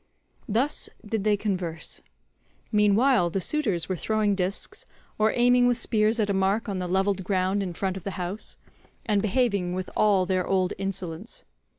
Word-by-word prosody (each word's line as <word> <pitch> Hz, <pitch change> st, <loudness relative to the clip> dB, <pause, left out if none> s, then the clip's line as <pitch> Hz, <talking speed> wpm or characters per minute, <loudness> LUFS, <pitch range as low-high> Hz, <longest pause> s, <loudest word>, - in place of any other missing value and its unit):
Thus 245 Hz, +8 st, +1 dB, 0.2 s
did 210 Hz, -1 st, -2 dB
they 210 Hz, -1 st, +3 dB
converse. 185 Hz, -6 st, -2 dB, 0.7 s
Meanwhile 210 Hz, -1 st, +4 dB
the 195 Hz, -, -1 dB
suitors 195 Hz, -, 0 dB
were 185 Hz, -, -1 dB
throwing 215 Hz, +3 st, +1 dB
discs, 190 Hz, 0 st, -3 dB, 0.3 s
or 215 Hz, +1 st, +4 dB
aiming 245 Hz, 0 st, +4 dB
with 245 Hz, -1 st, +2 dB
spears 220 Hz, -1 st, +1 dB
at 210 Hz, -, +2 dB
a 200 Hz, -, 0 dB
mark 195 Hz, +4 st, +1 dB
on 195 Hz, -3 st, -2 dB
the 180 Hz, -, -3 dB
levelled 190 Hz, +1 st, +1 dB
ground 190 Hz, +1 st, 0 dB
in 180 Hz, -3 st, -4 dB
front 190 Hz, +1 st, -1 dB
of 185 Hz, -, -9 dB
the 195 Hz, -, -5 dB
house, 185 Hz, +4 st, -5 dB, 0.5 s
and 205 Hz, -2 st, +2 dB
behaving 200 Hz, -5 st, +1 dB
with 185 Hz, 0 st, -4 dB
all 200 Hz, -3 st, +3 dB
their 185 Hz, -1 st, 0 dB
old 185 Hz, -1 st, +1 dB
insolence. 185 Hz, -4 st, -4 dB
200 Hz, 170 wpm, -26 LUFS, 185-215 Hz, 0.7 s, Meanwhile